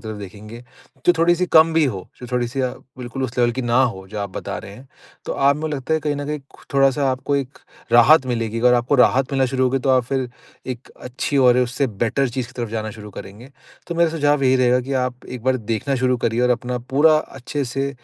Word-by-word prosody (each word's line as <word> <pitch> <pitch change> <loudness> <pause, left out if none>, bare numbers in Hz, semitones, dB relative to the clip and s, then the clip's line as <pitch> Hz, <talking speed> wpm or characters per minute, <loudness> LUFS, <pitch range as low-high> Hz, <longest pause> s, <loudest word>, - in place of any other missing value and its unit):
तरफ 110 - -5
देखेंगे, 105 +4 -10 0.5
जो 175 - +7
थोड़ी-सी 175 +2 +3
कम 160 +1 +6
भी 160 -2 +4
हो, 105 -9 -2 0.2
जो 125 - -7
थोड़ी-सी 125 +2 -1
अ, 130 -1 0 0.3
बिल्कुल 125 +2 -5
उस 120 0 -6
लेवल 120 -1 +3
की 130 +2 -3
ना 120 +2 +3
हो 95 -6 -2
जो 105 0 -6
आप 100 -1 -4
बता - - -4
रहे 100 - -10
हैं। 130 +4 -15 0.4
तो - - -3
आप 140 +1 +3
मुझे 155 -1 -3
लगता 135 +3 -2
है 160 - 0
कहीं 150 -1 -1
न 145 0 -5
कहीं 150 0 -3
कु - - -20
थोड़ा-सा 135 0 +3
आपको 130 +2 -1
एक 135 0 -4 0.3
राहत 135 +4 +6
मिलेगी, 115 -2 -2
अगर 125 0 +5
आपको 120 +4 +1
राहत 135 +1 +2
मिलना 135 -1 +2
शुरू 130 0 0
होगी, 130 +1 +1
तो 135 +1 0
आप 130 -1 +4
फिर, 130 0 -2 0.4
एक 125 -1 -6
अच्छी 125 +3 -3
और 125 -1 +5
उससे 125 +2 0 0.2
बेटर 135 +4 0
चीज़ 120 0 -4
की 125 - -16
तरफ 115 - -3
जाना 110 -1 -3
शुरू 105 -1 -10
करेंगे। 105 +7 -11 0.4
तो 170 - -4
मेरा 170 -1 +3
सुझाव 145 -3 +1
यही 130 0 +4
रहेगा 125 0 +3
कि 135 +2 -6
आप, 125 0 -6
एक 125 -3 -8
बार 130 0 +2 0.2
देखना 135 +6 -2
शुरू 125 0 +3
करिए 115 +1 +1
और 125 - +3
अपना 125 +1 -1 0.2
पूरा 155 +2 +6
अच्छे 140 0 -5
से 135 +2 -2
130 Hz, 240 wpm, -21 LUFS, 120-140 Hz, 0.5 s, जो